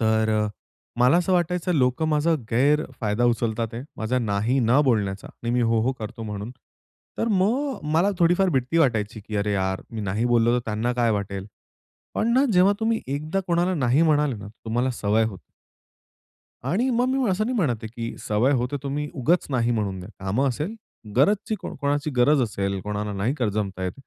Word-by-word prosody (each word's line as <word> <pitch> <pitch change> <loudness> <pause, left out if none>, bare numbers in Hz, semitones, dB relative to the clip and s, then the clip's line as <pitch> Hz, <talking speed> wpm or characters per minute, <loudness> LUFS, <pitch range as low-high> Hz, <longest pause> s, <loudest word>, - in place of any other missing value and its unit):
तर 110 -1 +2 0.5
मला 125 +6 +5
असं 180 +1 +1
वाटायचं 180 0 +1
लोकं 135 +3 +2
माझा 155 +2 +2 0.2
गैरफायदा 120 -4 +1
उचलत 115 -1 +1
आहेत, 115 +2 -4
माझा 115 +4 -1
नाही 110 +3 0
न 120 +5 +4
बोलण्याचा 100 -6 0
आणि 120 - -6
मी 125 - +2
हो, 115 -1 +2
हो 130 +3 +1
करतो 115 +2 -7
म्हणून. 105 0 -5 0.7
तर 230 - 0
मग 235 +9 +1
मला 180 +5 +4
थोडीफार 175 +2 +3
भीती 135 +2 0
वाटायची, 110 -8 +1
की 105 +1 -6
"अरे 105 0 0
यार! 95 -1 -1
मी 115 - -5
नाही 105 +3 -1
बोललो 120 -1 +3
तर 120 - -7
त्यांना 110 +3 -1
काय 120 -2 +1
वाटेल?" 100 -2 -3 0.7
पण 230 +2 +1
ना 265 +2 +5
जेव्हा 185 +2 +5
तुम्ही 225 0 +1
एकदा 155 +8 -2
कोणाला 175 +1 +1
नाही 135 +1 +2
म्हणाले 150 -4 +2
ना, 105 - -9
तर 105 +3 -16
तुम्हाला 120 +4 0
सवय 110 -2 +1
होते. 100 -5 -5 1.3
आणि 235 +9 +1
मग 245 0 +2
मी 260 -3 +1
असं 195 +3 +1
नाही 250 +2 -1
म्हणत 125 - 0
आहे - - -3
की 115 -1 -4
सवय 110 +6 +2
हो 125 -2 +1
तर 145 - -1
तुम्ही 145 +2 -2
उगाच 160 +7 +1
नाही 120 -3 +1
म्हणून 100 -5 -1
द्या. 90 - -9
कामं 105 +9 0
असेल, 150 - -3 0.4
गरजची 205 - +2
कोणाची 145 -3 -2
गरज 140 +3 +4
असेल, 100 -4 -2
कोणाला 105 0 -3
नाही 105 +7 0
कर 120 -7 0
जमतं 100 -2 -3
आहेत, 90 -1 -1
125 Hz, 185 wpm, -24 LUFS, 110-160 Hz, 1.3 s, मला